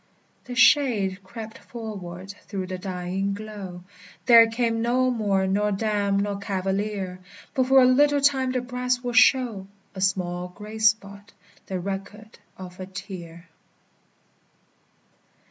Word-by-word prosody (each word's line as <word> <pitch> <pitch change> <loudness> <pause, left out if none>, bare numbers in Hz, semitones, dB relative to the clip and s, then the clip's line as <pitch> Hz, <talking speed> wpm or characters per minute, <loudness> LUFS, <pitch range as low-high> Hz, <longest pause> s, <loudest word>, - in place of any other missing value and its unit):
The 250 - -7
shade 225 -8 +4
crept 220 +3 -9
forward 195 -5 -8 0.2
through 190 -2 -4
the 185 0 -6
dying 190 +1 -3
glow; 200 -4 -8 0.4
There 230 -2 +8
came 230 0 0
no 255 +2 +2
more 200 -5 +1
nor 205 +2 +1
dame 205 -1 0
nor 200 0 -1
cavalier; 195 -1 -3 0.3
But 260 -1 +1
for 265 0 +6
a - - +6
little 285 +3 +4
time 270 -2 +2
the 255 -1 -1
brass 250 0 -2
will 245 -1 -3
show 245 -5 +4 0.3
A 190 - -7
small 180 -2 -1
gray 210 +4 -10
spot, 205 -1 0 0.3
the 190 -1 -3
record 200 +3 -7 0.2
of 180 -1 -10
a 185 - -6
tear. 180 -3 -9
205 Hz, 130 wpm, -25 LUFS, 190-235 Hz, 0.4 s, There